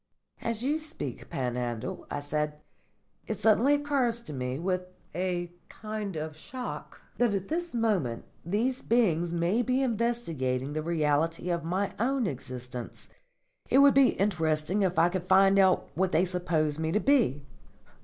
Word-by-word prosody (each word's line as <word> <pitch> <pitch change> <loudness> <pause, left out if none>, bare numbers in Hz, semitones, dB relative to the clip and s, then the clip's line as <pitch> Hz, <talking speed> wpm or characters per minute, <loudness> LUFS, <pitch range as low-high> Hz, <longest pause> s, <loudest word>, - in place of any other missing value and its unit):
"As 230 0 -2
you 295 +4 +1
speak, 305 - -6
Panhandle," 120 -3 -3
I 145 - -3
said, 150 +1 -2 0.7
"it 220 - -2
suddenly 225 +7 +4
occurs 275 -5 0
to 155 - -8
me, 125 -1 -3
with 180 +3 -1 0.3
a 175 0 -2 0.2
kind 215 -3 -5
of 155 0 -4
shock, 245 +10 -7 0.2
that 240 -4 +3
at 195 -1 -4
this 340 -2 -2
moment 195 - 0 0.2
these 230 +9 0
beings 175 -8 +2
may 175 +7 +1
be 255 +2 +1
investigating 165 - -1
the 155 - -1
reality 165 +1 0
of 170 -2 -1
my 185 +4 -1
own 255 +2 +1
existence. 125 -5 -6 0.6
It - - +4
would 280 0 +7
be 275 -2 +5
interesting 165 -1 +1
if 185 -3 +1
I 165 +1 +6
could 180 0 -4
find 195 +1 +5
out 190 -1 +4
what 185 +4 0
they 175 +2 +3
suppose 165 -4 0
me 160 0 -1
to 210 - +3
be." 215 - +2
180 Hz, 155 wpm, -29 LUFS, 155-230 Hz, 0.7 s, would